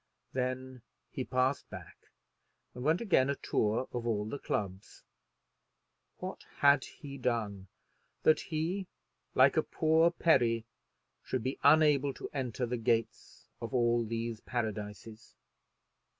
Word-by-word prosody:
Then 130 0 -3 0.3
he 130 - -3
passed 130 +2 0
back - - -11 0.7
and 125 - -7
went 160 - +2
again 165 - +3
a 140 - +1
tour 110 +1 0
of 120 -1 -3
all 105 -3 0
the 140 +5 -5
clubs. 95 -1 -4 1.1
What - - -6
had 140 -1 +5
he 140 -2 -10
done 110 -6 -2 0.6
that 155 - +5
he, 170 +4 -2 0.5
like - - +5
a - - +6
poor 160 +1 +3
Peri, 120 -10 +2 0.6
should 130 -3 -2
be 130 +2 -3
unable 145 -2 +5
to - - -7
enter 130 -3 -2
the 125 +1 -2
gates 115 0 -1 0.2
of 115 +3 -4
all 120 -1 +3
these 115 0 -3
paradises? 110 -1 -5
125 Hz, 125 wpm, -32 LUFS, 115-140 Hz, 1.1 s, a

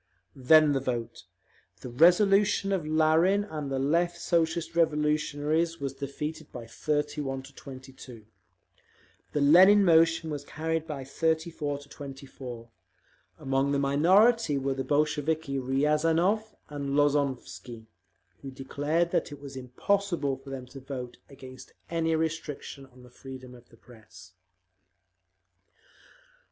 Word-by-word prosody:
Then 150 +3 +5
the 135 - +1
vote. 120 -3 -4 0.6
The 125 - -7
resolution 195 - +4
of 180 -6 -1
Larin 160 +6 +3
and 155 -8 -6
the 135 - -2
Left 170 +5 0
Socialist 165 -1 -1
Revolutionaries 155 +1 0
was 140 -1 -4
defeated 150 +3 -6
by 120 -2 -8
31 145 +1 -3
to 135 +1 -14
22; 130 -4 -12 1.1
the 150 - 0
Lenin 190 +8 +7
motion 165 -1 +3
was 145 -1 -5
carried 160 +2 -3
by 145 -4 -5
34 160 0 -2
to 140 0 -15
24. 135 -4 -10 0.7
Among 135 +1 0
the 140 - +1
minority 170 +7 +3
were 135 0 -1
the 135 0 -3
Bolsheviki 150 0 0
Riazanov 160 +10 +1
and 140 -1 -4
Lozovsky, 140 -5 -1 0.6
who 140 - -7
declared 145 +6 -2
that - - -1
it 145 - -9
was 140 -1 -10
impossible 145 +4 -1
for 135 +1 -14
them 135 -2 -6
to 130 +2 -11
vote 130 -2 -7
against 130 -2 -13 0.2
any 165 -1 0
restriction 155 -3 -4
on 125 -1 -18
the 125 - -16
freedom 130 0 -11
of 120 -1 -17
the 115 - -20
Press. 110 -6 -16
145 Hz, 125 wpm, -28 LUFS, 135-160 Hz, 1.1 s, Lenin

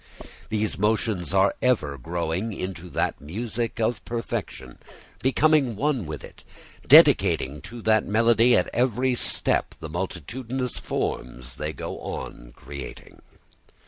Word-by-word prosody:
These 110 -2 -1
motions 105 -3 0
are 95 +1 +4
ever 110 - +1
growing 85 - -3
into 90 -2 -6
that - - -1
music 115 - -4
of 115 +1 0
perfection, 85 - -5 0.4
becoming 135 -2 +3
one 130 - 0
with 75 -1 -6
it, - - -13 0.4
dedicating 70 +2 +6
to 120 - -9
that 110 -1 +3
melody 115 +3 +4
at 90 - +1
every 125 +1 +1
step 120 - +1
the 80 - -7
multitudinous 115 - -4
forms 60 0 -4
they 75 +1 -3
go - - -6
on - - -7
creating. 70 +1 -10
105 Hz, 120 wpm, -25 LUFS, 80-120 Hz, 0.4 s, dedicating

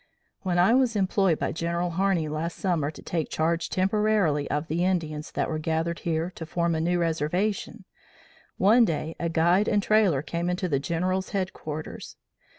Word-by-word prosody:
When 180 -2 -1
I 180 +6 +5
was 250 -3 +3
employed 190 -3 +2
by - - -2
General 170 +2 -2
Harney 185 -2 +1
last 155 +3 -3
summer 170 -7 0
to 155 - -11
take 165 -3 -2
charge 165 +1 0
temporarily 195 -6 +1
of 150 +3 -1
the 170 +2 0
Indians 160 -5 -1
that - - 0
were 155 - -2
gathered 165 +2 -1
here 165 +1 -1
to 165 - -5
form 170 0 0
a 160 - 0
new 175 +2 +1
reservation, 170 +5 -1 0.7
one 225 +5 +5
day 160 -4 -1
a 170 - -1
guide 170 +5 +3
and 205 -1 +2
trailer 205 -11 +3
came 170 +2 -2
into 180 +1 -1
the 140 -5 +1
General's 185 +5 -1
headquarters. 155 -5 -5
170 Hz, 170 wpm, -26 LUFS, 160-190 Hz, 0.7 s, I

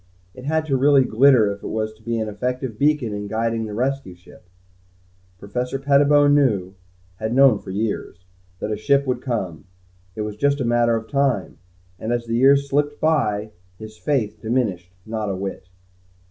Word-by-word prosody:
It 130 - -11
had 160 +1 0
to 140 -3 0
really 140 0 +5
glitter 125 -3 +4
if 100 - -8
it - - -6
was 110 0 -3
to 110 - -24
be 115 +1 -2
an 110 -1 -2
effective 125 +2 -4
beacon 145 -6 +1
in 105 0 -5
guiding 115 +1 -1
the 105 - -6
rescue 130 -5 -2
ship. 90 0 -19 0.9
Professor 125 +7 -3
Pettibone 145 +1 +4
knew 105 -11 +2 0.4
had 110 +4 -3
known 135 -6 +6
for - - -12
years 100 -3 -4 0.3
that 105 - -4
a 105 - -1
ship 140 +5 +2
would 125 -2 -2
come. 95 - -4 0.5
It 110 - -4
was 105 -1 -5
just 140 +3 +1
a 130 - -1
matter 120 0 +2
of 110 0 -4
time, 135 - -1 0.4
and 110 - -3
as 120 -1 -1
the 115 - -4
years 140 +3 +4
slipped 145 +1 0
by, 110 -10 0 0.3
his 110 +1 -10
faith 110 -5 -2
diminished 110 -7 -1
not 110 -2 -3
a 95 - -2
whit. 95 -1 -6
115 Hz, 180 wpm, -22 LUFS, 105-140 Hz, 0.9 s, known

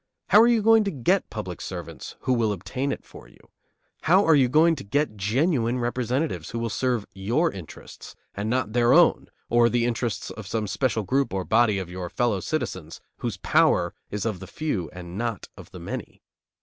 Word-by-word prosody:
How 210 - +8
are 230 - +6
you 235 -3 +3
going 225 0 +6
to - - 0
get 175 +5 0
public 95 -5 -6
servants 85 -3 -7
who 130 - +1
will 115 -3 +1
obtain 130 +8 -3
it - - -6
for - - -14
you? - - -21 0.7
How 185 +6 +5
are 165 - +5
you 135 -4 +4
going 160 +5 +4
to - - -7
get 140 +3 -1
genuine 120 - +1
representatives 125 - -2
who 115 - -5
will 115 -1 -2
serve 125 -4 0
your 115 - 0
interests, 90 -5 -11 0.2
and 100 +2 -3
not 120 -3 -1
their 120 0 +4
own - - +4 0.2
or 120 0 +4
the 120 -1 +1
interests 120 -3 -2
of 110 -3 -9
some 110 +1 -2
special 115 +1 -1
group 130 +1 0
or 95 -1 -2
body 110 -2 +3
of 95 -2 -5
your 90 -1 -5
fellow 115 -2 0
citizens 95 - -4 0.2
whose - - -4
power - - +2 0.2
is 105 +1 -4
of 110 -5 -2
the 95 - -9
few 100 - -3
and 90 +1 -8
not 115 -4 -3
of - - -12
the - - -10
many? - - -7
115 Hz, 200 wpm, -25 LUFS, 100-135 Hz, 0.7 s, How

